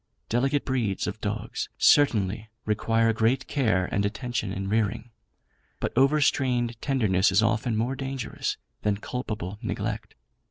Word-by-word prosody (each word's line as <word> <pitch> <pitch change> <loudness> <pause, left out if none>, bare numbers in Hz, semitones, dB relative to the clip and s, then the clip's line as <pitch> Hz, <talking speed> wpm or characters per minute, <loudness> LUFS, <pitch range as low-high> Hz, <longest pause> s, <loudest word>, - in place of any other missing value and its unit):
Delicate 135 +5 +1
breeds 120 -7 0
of - - -5
dogs - - -3
certainly 110 -6 +3 0.2
require 115 +1 +2
great 115 +4 +1
care 110 -10 +1
and 100 - +1
attention 115 -1 -2
in 95 0 -3
rearing; 110 +2 -1 0.7
but - - -3
overstrained 130 -3 +2
tenderness 105 -8 +2
is 100 +4 +4
often 115 0 +1
more 120 +4 0
dangerous 135 -2 -3 0.2
than 105 -1 +1
culpable 105 -4 -5
neglect. 110 -2 -4
115 Hz, 125 wpm, -26 LUFS, 105-125 Hz, 0.7 s, is